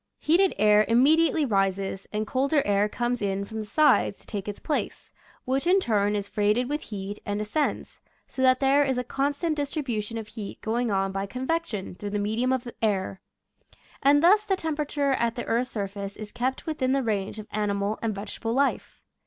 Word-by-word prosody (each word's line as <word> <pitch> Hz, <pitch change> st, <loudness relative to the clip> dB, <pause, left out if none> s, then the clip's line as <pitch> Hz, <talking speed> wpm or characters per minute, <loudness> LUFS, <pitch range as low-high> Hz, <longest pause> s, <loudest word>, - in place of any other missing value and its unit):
Ileated 360 Hz, +5 st, +4 dB
air 210 Hz, +1 st, +5 dB
immediately 305 Hz, +6 st, +4 dB
rises, 195 Hz, -3 st, -1 dB
and 215 Hz, 0 st, -1 dB
colder 275 Hz, +5 st, +1 dB
air 205 Hz, +1 st, +2 dB
comes 240 Hz, +1 st, -2 dB
in 200 Hz, 0 st, -1 dB
from 220 Hz, +2 st, -6 dB
the 215 Hz, -, -5 dB
sides 295 Hz, -7 st, +3 dB
to -, -, -18 dB
take 205 Hz, -3 st, -5 dB
its 205 Hz, -, -5 dB
place, 300 Hz, -, -3 dB, 0.3 s
which 270 Hz, +5 st, 0 dB
in 380 Hz, +2 st, +5 dB
turn 210 Hz, -, +1 dB
is 200 Hz, -1 st, -2 dB
freighted 210 Hz, +5 st, +1 dB
with 295 Hz, +2 st, -2 dB
heat 205 Hz, -1 st, -6 dB
and 205 Hz, 0 st, -2 dB
as 210 Hz, 0 st, -5 dB
cends, 305 Hz, -2 st, -1 dB, 0.3 s
so 260 Hz, -, -6 dB
that 255 Hz, 0 st, +5 dB
there 275 Hz, +2 st, +4 dB
is 265 Hz, -2 st, 0 dB
a 250 Hz, -, 0 dB
constant 285 Hz, +5 st, -1 dB
distribution 255 Hz, -7 st, -3 dB
of 220 Hz, -1 st, -6 dB
heat 210 Hz, -4 st, -7 dB
going 235 Hz, +2 st, -1 dB
on 195 Hz, -1 st, 0 dB
by 195 Hz, +1 st, -3 dB
convection 255 Hz, -, -3 dB
through 205 Hz, +3 st, -6 dB
the 205 Hz, -, -2 dB
medium 220 Hz, +5 st, 0 dB
of 260 Hz, -2 st, 0 dB
the 240 Hz, -, -8 dB
air. 195 Hz, -3 st, 0 dB, 0.8 s
And 290 Hz, +2 st, +4 dB
thus 410 Hz, +5 st, +6 dB
the 395 Hz, -2 st, +1 dB
temperature 295 Hz, -4 st, -1 dB
at 235 Hz, -3 st, 0 dB
the 240 Hz, -, -4 dB
earth's 245 Hz, +2 st, 0 dB
surface 200 Hz, -2 st, -5 dB
is 210 Hz, -1 st, -8 dB
kept 260 Hz, +2 st, -2 dB
within 265 Hz, -5 st, 0 dB
the 275 Hz, -1 st, +1 dB
range 205 Hz, -3 st, -2 dB
of 215 Hz, -, -7 dB
animal 205 Hz, 0 st, -1 dB
and 220 Hz, -3 st, -1 dB
vegetable 215 Hz, +3 st, -4 dB
life. 275 Hz, +2 st, -1 dB
230 Hz, 195 wpm, -26 LUFS, 205-275 Hz, 0.8 s, thus